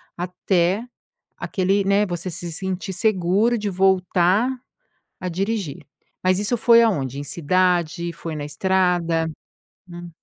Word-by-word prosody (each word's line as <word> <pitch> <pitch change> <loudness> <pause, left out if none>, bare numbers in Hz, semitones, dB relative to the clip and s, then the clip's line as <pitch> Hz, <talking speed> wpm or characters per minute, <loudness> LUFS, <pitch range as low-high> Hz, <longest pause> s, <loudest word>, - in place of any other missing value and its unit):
até 180 +3 0 0.6
aquele 195 +1 0
né, 200 +1 +3
você 175 0 -4
se 170 +1 -4
sentir 190 +2 -4
seguro 205 +3 +2
de 210 -1 -2
voltar 190 +3 +2 0.7
a 185 - -4
dirigir. 195 -3 -3 0.4
Mas 185 +1 +2
isso 210 +4 0
foi 235 +1 +6
aonde? 140 - 0
Em 145 - -5
cidade, 175 +1 0
foi 165 -1 -7
na 145 -1 -4
estrada? 175 -1 +1 0.6
Hum. 175 0 -9
185 Hz, 125 wpm, -22 LUFS, 170-195 Hz, 0.7 s, foi